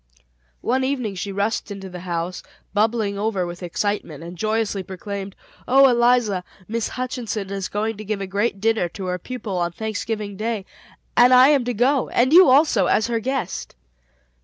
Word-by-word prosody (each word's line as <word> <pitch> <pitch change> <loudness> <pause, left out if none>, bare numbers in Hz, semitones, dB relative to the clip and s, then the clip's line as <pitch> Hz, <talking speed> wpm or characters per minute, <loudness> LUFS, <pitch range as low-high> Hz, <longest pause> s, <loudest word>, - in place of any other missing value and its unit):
One 260 +2 +1
evening 255 -6 -1
she 195 +2 -4
rushed 205 +4 -1
into 195 -1 -7
the 180 -1 -8
house 175 0 -3 0.3
bubbling 210 -1 +1
over 205 -4 0
with 175 +1 -7
excitement 175 -3 -3
and 170 +1 -8
joyously 215 +1 -1
proclaimed: 195 +1 -6 0.3
"Oh, 270 +2 +7
Eliza, 240 -6 +3 0.2
Miss 230 0 -2
Hutchinson 235 -6 -4
is 195 -2 -3
going 215 +1 -2
to 215 - -7
give 215 -1 -3
a 195 - -3
great 200 +2 -1
dinner 220 -4 +1
to 190 +2 -7
her 180 0 -2
pupils 210 -4 -4
on 170 0 -1
Thanksgiving 215 -1 -4
Day; 215 -2 -2 0.5
and 250 +1 +7
I 255 +2 +8
am 285 -4 +4
to 245 - -1
go, 255 +4 +2
and 255 +5 +2
you 365 -3 +9
also, 255 - +4
as 220 - +2
her 230 -1 0
guest." 245 - -3
215 Hz, 175 wpm, -22 LUFS, 195-240 Hz, 0.5 s, you